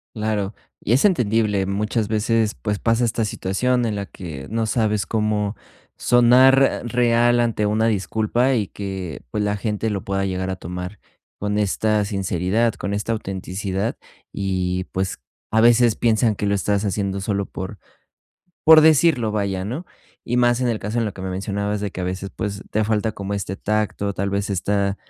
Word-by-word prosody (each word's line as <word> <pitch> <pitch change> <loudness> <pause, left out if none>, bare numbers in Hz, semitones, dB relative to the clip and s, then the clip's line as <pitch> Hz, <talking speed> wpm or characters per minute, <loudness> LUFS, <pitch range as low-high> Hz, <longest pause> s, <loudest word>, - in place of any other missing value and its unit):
Claro, 105 -2 -2 0.3
y 115 - +1
es 135 - +4
entendible 110 - +2
muchas 105 +2 -1
veces, 110 0 +1
pues, 105 -2 -3
pasa 115 +1 +2
esta 115 -1 0
situación 120 +5 0
en 110 -2 -1
la 100 -1 -4
que 75 -7 -8
no 115 0 -1
sabes 105 -2 0
cómo 105 -1 -1 0.4
sonar 125 +3 +6
r - - +1
real 120 0 +3
ante 115 -3 +1
una 110 +2 +1
disculpa 110 +4 +1
y 105 -5 0
que, 95 -6 -6
pues, 105 +10 -1
la 105 0 0
gente 105 +1 -2
lo 100 -2 -3
pueda 95 0 -1
llegar 95 0 -2
a 95 - -2
tomar 90 +2 -7 0.4
con 105 +1 -1
esta 105 +1 +1
sinceridad, 100 +3 0
con 100 0 -4
esta 105 +2 -2
autenticidad, 95 0 -3 0.4
y 95 -2 -1
pues, 95 0 -2 0.3
a 110 - +3
veces 120 -1 +5
piensan 115 -1 +2
que 100 - -2
lo 100 - +2
estás 100 +1 0
haciendo 100 0 -1
solo 100 -1 -1
por 95 +2 -7 0.9
por 160 0 +10
decirlo, 155 -6 +4
vaya, 100 -3 -1
¿no?, 135 - -4 0.4
y 120 +1 0
más 120 +1 +3
en 125 - +1
el 115 - 0
caso 105 +4 -3
en 115 - +1
lo 105 - -3
que - - -11
me 95 - -4
mencionabas 100 +2 -2
de 100 - -2
que 95 - -7
a - - -2
veces, 95 +1 -4
pues, 100 -2 -4
te 110 - +1
falta 110 0 0
como 100 0 -4
este 95 -1 -4
tacto, 105 -1 -1
tal 100 +1 -2
vez 100 0 -1
esta, 100 +1 0
105 Hz, 180 wpm, -22 LUFS, 100-115 Hz, 0.9 s, por